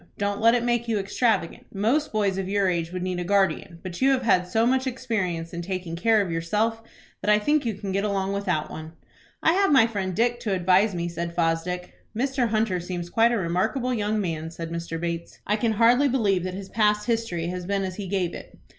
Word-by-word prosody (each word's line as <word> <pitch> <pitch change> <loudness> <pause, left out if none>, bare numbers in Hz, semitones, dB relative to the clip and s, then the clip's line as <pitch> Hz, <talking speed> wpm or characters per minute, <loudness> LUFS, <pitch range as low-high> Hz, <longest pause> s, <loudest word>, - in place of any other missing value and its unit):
Don't 200 0 -1
let 230 +2 +6
it 240 - 0
make 240 -1 0
you 225 -2 +1
extravagant. 200 -2 0
Most 235 +10 +1
boys 200 -3 0
of 190 -1 -3
your 200 -1 +2
age 170 -2 -1
would 180 0 -4
need 185 -1 -2
a - - -2
guardian, 190 -2 +1
but 185 +1 -7
you 270 - +5
have 265 -2 +2
had 180 -6 +3
so 225 +5 +2
much 260 +2 +2
experience 200 -10 -2
in 170 - -4
taking 180 -2 -4
care 215 +4 +3
of 180 - -5
yourself, 210 +8 0 0.4
that - - -1
I 210 - +6
think 290 +5 +1
you 220 - -1
can 195 0 -5
get 195 +1 0
along 195 -2 -1
without 180 -6 -1
one." 160 +1 -8 0.5
"I 320 - +5
have 390 -1 +3
my 265 -6 +7
friend 195 -5 -3
Dick 240 +2 +1
to 215 -5 -1
advise 185 +3 +3
me," 170 0 -2
said 170 0 -4
Fosdick. 175 +2 -1 0.2
"Mr. 260 0 +1
Hunter 215 -4 0
seems 175 0 -5
quite 230 +1 +4
a 235 - +1
remarkable 215 +8 0
young 215 -1 0
man," 165 -4 -3
said 165 0 -7
Mr. 170 -1 -4
Bates. 170 0 -4
"I 210 - +1
can 220 +1 0
hardly 240 +6 +4
believe 205 -9 +1
that 185 0 -4
his 195 0 -7
past 210 -2 +2
history 225 -8 -1
has 180 0 -5
been 200 0 0
as 185 -1 -4
he 200 -2 -5
gave 180 -2 -1
it." - - -10
200 Hz, 225 wpm, -25 LUFS, 175-225 Hz, 0.5 s, my